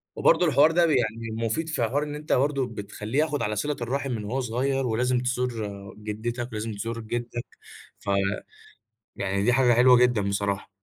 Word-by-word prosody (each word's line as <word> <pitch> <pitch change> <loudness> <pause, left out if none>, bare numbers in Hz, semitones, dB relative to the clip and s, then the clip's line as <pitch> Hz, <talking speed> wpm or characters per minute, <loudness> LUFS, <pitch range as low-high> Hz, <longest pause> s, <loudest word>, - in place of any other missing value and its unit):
وبرضه 180 - +4
الحوار 155 -1 +5
ده 170 +1 +4
ب - - +1
يعني 115 -4 0
مفيد 160 +9 -1
في 140 -6 -1
حوار 135 +6 0
إن 150 -1 -5
أنت 150 +1 -2
برضه 135 -1 +1
بتخلّيه 105 +3 -4
ياخد 150 -2 +1
على 105 +1 -1
صِلة 145 +8 -1
الرَّحم 135 +3 -2
من 110 -3 -3
وهو 125 +6 -2
صغيَّر، 130 +3 0
ولازم 125 +2 +1
تزور 115 -6 -3
جدِّتك 115 +3 -4
ولازم 110 0 -4
تزور 115 +3 -4
جدَّك 120 +1 -4 0.5
ف - - -7 1.1
يعني 100 0 -1
دي 125 +4 +3
حاجة 125 -1 +4
حلوة 125 +1 +7
جدًا 125 -3 +3
بصراحة. 100 0 -1
120 Hz, 175 wpm, -26 LUFS, 110-135 Hz, 1.1 s, حلوة